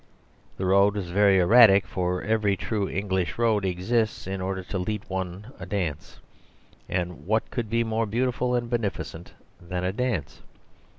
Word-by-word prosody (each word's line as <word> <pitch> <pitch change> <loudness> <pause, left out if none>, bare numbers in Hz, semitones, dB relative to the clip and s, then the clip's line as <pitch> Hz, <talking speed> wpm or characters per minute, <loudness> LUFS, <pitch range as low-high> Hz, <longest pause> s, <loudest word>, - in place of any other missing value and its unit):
The 95 - -2
road 100 +2 +4
was 95 -4 -4
very 100 0 +4
erratic, 100 +1 +7
for 90 -1 -2
every 105 -3 +1
true 105 -1 -2
English 95 -3 -2
road 115 -3 +2
exists 110 +5 -1
in 95 0 -4
order 95 0 -3
to 95 +1 -4
lead 105 +3 -3
one 95 +4 -5
a - - -7
dance; 90 -8 -3 0.7
and 90 -4 -3
what 110 +2 0
could 120 -4 -3
be 115 +1 +1
more 110 0 -1
beautiful 125 +2 0
and 120 -1 -1
beneficent 105 -7 -4 0.3
than 90 0 -4
a 90 +1 -1
dance? 110 - -2
100 Hz, 160 wpm, -26 LUFS, 90-110 Hz, 0.7 s, erratic